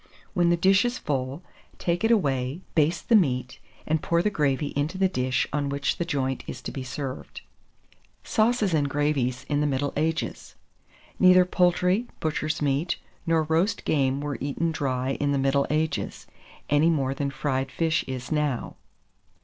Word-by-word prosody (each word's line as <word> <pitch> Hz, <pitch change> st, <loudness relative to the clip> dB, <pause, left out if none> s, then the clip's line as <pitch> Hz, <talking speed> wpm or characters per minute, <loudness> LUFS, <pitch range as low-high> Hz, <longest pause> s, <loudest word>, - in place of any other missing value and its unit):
When 175 Hz, -1 st, +3 dB
the 170 Hz, -, +3 dB
dish 190 Hz, +3 st, +4 dB
is 245 Hz, +1 st, -1 dB
full, 135 Hz, +2 st, -3 dB, 0.3 s
take 175 Hz, +2 st, -1 dB
it 225 Hz, -, +3 dB
away, 140 Hz, -, +1 dB
baste 155 Hz, +1 st, +1 dB
the 235 Hz, -, +5 dB
meat, 130 Hz, -, +1 dB, 0.3 s
and 155 Hz, 0 st, 0 dB
pour 170 Hz, 0 st, +1 dB
the 210 Hz, -, +1 dB
gravy 145 Hz, -4 st, 0 dB
into 150 Hz, +6 st, -1 dB
the 190 Hz, 0 st, +3 dB
dish 130 Hz, -7 st, 0 dB
on 145 Hz, -1 st, 0 dB
which 140 Hz, 0 st, -1 dB
the 170 Hz, -, 0 dB
joint 135 Hz, -5 st, -2 dB
is 125 Hz, -, -6 dB
to -, -, -4 dB
be 135 Hz, -, -5 dB
served. 130 Hz, +1 st, -6 dB, 0.8 s
SAUCES 215 Hz, -4 st, +1 dB
AND 145 Hz, -3 st, +2 dB
GRAVIES 140 Hz, -3 st, 0 dB
IN 145 Hz, -1 st, 0 dB
THE 150 Hz, -, +2 dB
MIDDLE 140 Hz, 0 st, -1 dB
AGES. 160 Hz, +2 st, -2 dB, 0.6 s
Neither 185 Hz, -1 st, +7 dB
poultry, 180 Hz, +5 st, +2 dB
butcher's 155 Hz, -1 st, -1 dB
meat, 145 Hz, +4 st, 0 dB, 0.3 s
nor 165 Hz, -1 st, +3 dB
roast 165 Hz, +7 st, 0 dB
game 135 Hz, -2 st, +1 dB
were 145 Hz, -1 st, -4 dB
eaten 145 Hz, +4 st, -1 dB
dry 135 Hz, -3 st, -1 dB
in 145 Hz, 0 st, +1 dB
the -, -, +1 dB
middle 135 Hz, +1 st, +2 dB
ages, 155 Hz, +1 st, -2 dB, 0.4 s
any 145 Hz, +3 st, +4 dB
more 135 Hz, -5 st, +1 dB
than 140 Hz, 0 st, -2 dB
fried 135 Hz, -1 st, -2 dB
fish 165 Hz, -1 st, +1 dB
is 130 Hz, 0 st, -5 dB
now. 150 Hz, -5 st, -1 dB
150 Hz, 165 wpm, -26 LUFS, 135-170 Hz, 0.8 s, Neither